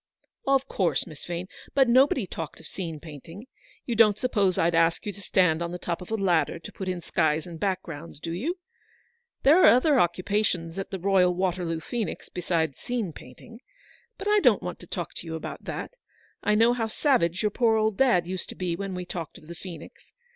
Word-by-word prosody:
" - - -34
Of 270 0 0
course, 185 -9 0
Miss 155 -5 -11
Vane. 175 +1 -4 0.3
But 270 -2 +5
nobody 255 -1 +4
talked 165 -3 -7
of - - -14
scene 165 -5 -5
painting. 165 - -10 0.4
You 240 - -1
don't 215 -2 +5
suppose 205 -7 +1
I'd 170 +1 +2
ask 165 0 +2
you 205 - -3
to 200 - -12
stand 180 -4 +2
on 170 0 -2
the 180 - -4
top 175 0 -3
of 180 - -9
a 220 - 0
ladder 180 -7 +1
to 165 - -10
put 190 -1 -5
in 180 -1 -3
skies 155 0 +1
and 170 -2 -9
backgrounds, 170 -6 -3
do 165 - -5
you? 280 - -2 0.9
There 310 +7 +7
are - - +8
other 265 +3 +5
occupations 180 -1 0
at 195 - -4
the 190 - -4
Royal 185 -1 +3
Waterloo 175 -3 -1
Phoenix 230 +3 -4
besides 165 -5 -1
scene 230 -9 -3
painting. 225 - -13 0.6
But 390 - -5
I 420 0 +5
don't - - +4
want - - -5
to - - -12
talk - - -5
to - - -7
you 160 - -4
about 160 - -7
that: - - -5 0.5
I 210 - +2
know 230 +3 +5
how 230 -2 -1
savage 215 - +1
your 210 - +2
poor 230 0 +3
old 215 -1 +1
dad 190 -10 +3
used 185 +1 -5
to - - -7
be 180 -2 -2
when 195 +1 -4
we 180 0 -4
talked 170 -3 -6
of - - -16
the 170 - -8
Phoenix. 170 -2 -11
185 Hz, 210 wpm, -26 LUFS, 170-220 Hz, 0.9 s, are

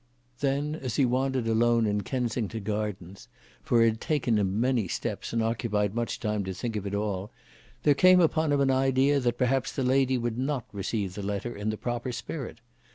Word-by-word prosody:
Then, 140 +2 0
as 130 -8 -4
he 140 - +4
wandered 130 0 0
alone 115 +1 +3
in 105 -1 0
Kensington 115 -3 -2
Gardens, 105 -2 -4 0.3
for 120 -2 +3
it - - +5
had 110 0 -4
taken 125 -8 +1
him 100 +1 0
many 125 -4 +1
steps, - - -4
and 115 -1 0
occupied 110 -3 0
much 120 0 -2
time 105 -2 -1
to 95 0 -4
think 115 +4 -4
of 100 -1 -3
it 100 - -3
all, 100 -1 -2 0.5
there 145 - +5
came 185 +5 +6
upon 160 -2 +2
him 145 -1 +2
an 135 -1 +3
idea 135 +2 +3
that 120 -2 0
perhaps 125 +1 +1
the 135 - -2
lady 130 0 +3
would 120 -1 -2
not 135 -2 -1
receive 100 -1 -2
the 105 - -6
letter 100 +4 -3
in 105 +1 -3
the 110 - -2
proper 120 +2 -3
spirit. 125 -2 -6
120 Hz, 200 wpm, -28 LUFS, 105-130 Hz, 0.5 s, came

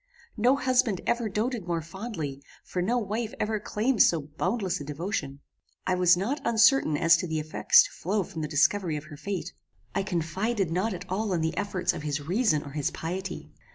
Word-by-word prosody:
No 245 +4 +4
husband 250 -8 +2
ever 235 -2 0
doated 215 -1 -2
more 170 -2 -1
fondly, 165 - -6 0.2
for 180 - -3
no 230 +7 +1
wife 220 0 -3
ever 215 0 0
claimed 215 +3 0
so 165 - +5
boundless 170 +6 -2
a - - -4
devotion. 145 -2 -4 0.4
I 185 - +1
was 180 -1 +5
not 240 +11 -2
uncertain 230 - +4
as 165 +2 +6
to 180 - -3
the 160 -1 -2
effects 155 +1 +5
to - - -7
flow 200 +3 -1
from 170 -2 -7
the 150 - -2
discovery 160 +3 +2
of 150 - -7
her 150 - -11
fate. 190 +4 -4 0.4
I 195 - +1
confided 190 +2 -1
not 190 +4 0
at 180 +1 -8
all 195 +2 -1
in 170 - 0
the 160 0 -1
efforts 200 -3 -1
of - - -6
his 150 -1 -2
reason 175 - +1
or 140 - -9
his 145 -1 -1
piety. 180 +2 -5
185 Hz, 195 wpm, -27 LUFS, 160-215 Hz, 0.4 s, as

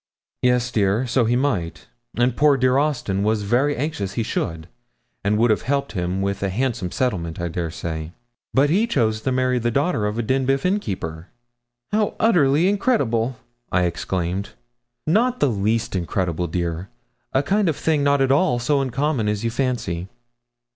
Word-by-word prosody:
'Yes, 125 -1 +2
dear; 105 +2 +1
so 125 0 +2
he 120 +2 +2
might, 115 -11 -1 0.3
and 120 0 +2
poor 145 0 +4
dear 130 +1 +3
Austin 130 -10 0
was 105 0 +1
very 130 +8 +2
anxious 120 -9 -3
he 115 - -1
should, 80 -6 -3 0.6
and 105 +1 +2
would 115 +1 +4
have 105 - +1
helped 140 +2 -1
him 90 0 -2
with 100 0 -2
a 100 - 0
handsome 110 -3 -1
settlement, 90 -11 -2
I 85 0 -2
dare 85 0 -3
say, 80 0 -5 0.4
but 140 +2 +3
he 210 +7 +3
chose 110 - +1
to 130 - -1
marry 130 0 +1
the 120 0 0
daughter 140 -3 +1
of 105 +2 -3
a 120 - 0
Denbigh 135 +4 +1
innkeeper.' 95 - -2 0.6
'How 210 0 +1
utterly 170 -7 +4
incredible!' 130 - +1 0.3
I 90 - +2
exclaimed. 90 +2 -2 0.6
'Not 235 +9 +2
the 145 - +3
least 110 +1 0
incredible, 90 -1 -1
dear 85 +2 -3 0.4
a 135 - +2
kind 195 +4 +2
of 155 - 0
thing 155 -1 +1
not 140 -1 +3
at 135 0 +3
all 140 -2 +3
so 140 +4 +1
uncommon 135 -2 0
as 105 +1 -2
you 115 - 0
fancy.' 120 -9 -2
120 Hz, 170 wpm, -22 LUFS, 95-140 Hz, 0.6 s, poor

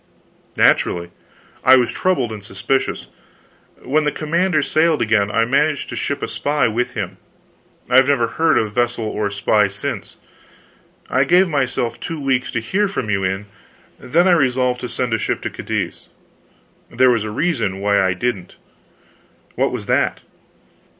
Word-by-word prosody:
"Naturally. 85 0 +2 0.5
I 130 - +7
was 125 -2 +2
troubled 135 -11 0
and 105 -2 -7
suspicious. 105 +7 -2 0.8
When 150 +4 +1
the 150 - +1
commander 165 +1 0
sailed 160 +1 +2
again 105 -2 +2
I 115 +2 +2
managed 145 +4 0
to - - -5
ship 140 +4 -3
a - - -1
spy 145 -2 0
with 115 +2 -2
him. 95 -4 -4 0.7
I 125 - +3
have 130 0 +6
never 140 -5 +2
heard 160 +5 +2
of 105 -2 -1
vessel 120 -1 0
or 105 -1 -2
spy 100 +1 +2
since. 100 +1 -6 0.9
I 130 - +2
gave 180 +6 +4
myself 130 -6 -1
two 165 -1 -5
weeks 130 -3 0
to 120 - -1
hear 195 - 0
from 130 - -3
you 100 -1 0
in. 95 +2 -2 0.5
Then 170 +8 +2
I - - +5
resolved 130 -5 +2
to 125 - -5
send 125 -3 -2
a 115 - +1
ship - - -1
to - - -3
Cadiz. - - -4 0.8
There 130 -1 +4
was 115 -3 +1
a 110 - -4
reason 115 - -1
why 100 0 +2
I 95 -1 +1
didn't." 100 -3 -3 1.0
"What - - 0
was - - -5
that?" - - 0
125 Hz, 165 wpm, -19 LUFS, 105-145 Hz, 1.0 s, I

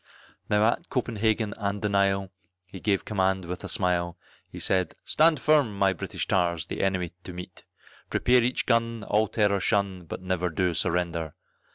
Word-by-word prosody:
Now 105 +1 +3
at 115 - 0
Copenhagen 110 -3 0
and 100 -1 -2
the - - +2
Nile, 100 -1 +1 0.3
he 95 +1 -10
gave 100 -1 0
command 95 -3 0
with 90 +1 -6
a - - -5
smile, 85 -2 0 0.3
He - - -9
said, 95 -3 +1
"Stand 155 -1 +4
firm, 140 -8 +3
my 95 -1 +3
British 85 - -4
tars, 85 -4 +1
the - - -4
enemy 95 -3 0
to 90 - -8
meet; 90 0 -10 0.4
Prepare 125 0 +3
each 125 +2 0
gun 115 -1 +1
all 105 +2 +2
terror 100 -1 +1
shun, 95 -3 0
but 85 - -7
never 90 -1 -1
do 90 +2 0
surrender! 85 -2 -1
95 Hz, 170 wpm, -27 LUFS, 90-110 Hz, 0.4 s, Stand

